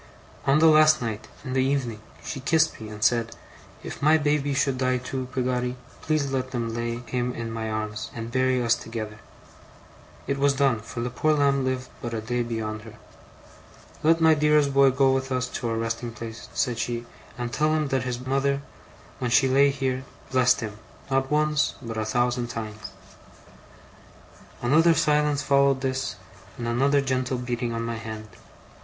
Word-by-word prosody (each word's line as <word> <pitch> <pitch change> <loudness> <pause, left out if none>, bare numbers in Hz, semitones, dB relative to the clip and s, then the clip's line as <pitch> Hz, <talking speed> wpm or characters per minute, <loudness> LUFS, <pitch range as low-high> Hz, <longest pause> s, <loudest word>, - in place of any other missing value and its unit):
'On 135 +2 +5
the 160 - +5
last 155 -1 +6
night, 110 -3 -4 0.2
in 130 - -4
the 130 0 +2
evening, 130 -5 -1 0.2
she 140 - -5
kissed 155 0 +2
me, 110 - -7
and 105 0 -6
said: 115 0 +2 0.5
"If - - -7
my 155 +2 +5
baby 145 -2 +1
should 135 -2 +1
die 130 -1 +2
too, 125 +1 -4
Peggotty, 125 -1 -1 0.3
please 155 -3 0
let 130 -1 -1
them 120 -3 -3
lay 120 0 -3
him 125 0 -2
in 115 -1 -4
my 110 -1 -3
arms, 110 0 -3
and 115 0 -5
bury 130 0 +2
us 115 0 +4
together." 110 -2 -5 1.1
(It 140 0 -2
was 140 0 +3
done; 135 -5 +2
for 115 +2 -7
the 120 +1 -2
poor 155 +5 +2
lamb 140 -2 +2
lived 130 -1 -2
but 120 -1 -4
a - - -1
day 120 +3 -1
beyond 110 -2 -3
her.) 110 0 -12 1.1
"Let 165 +2 +4
my 160 -1 +6
dearest 150 -2 +3
boy 135 0 +6
go 135 0 +3
with 135 0 -2
us 125 0 0
to 120 - -3
our 115 - -1
resting 115 +1 -2
place," 115 -1 -8
she 125 - +1
said, 120 0 -3 0.3
"and 120 -1 -4
tell 155 +6 +2
him 155 -2 0
that 135 -1 +1
his 125 0 -4
mother, 140 +1 0 0.6
when 125 - -1
she 135 +3 +4
lay 140 +2 +5
here, 130 -2 -2 0.3
blessed 125 -1 +4
him 105 -2 -6 0.3
not 135 0 +1
once, 150 0 +2
but 115 -4 -6
a 110 - -1
thousand 120 +1 0
times."' 110 -2 -6 1.7
Another 160 +7 +5
silence 150 -2 +2
followed 140 -1 +3
this, 130 0 -2 0.4
and 120 - -4
another 140 +4 +3
gentle 130 -1 -1
beating 120 -1 -2
on 115 0 -2
my 115 0 -3
hand. 110 -1 -7
130 Hz, 180 wpm, -25 LUFS, 115-140 Hz, 1.7 s, last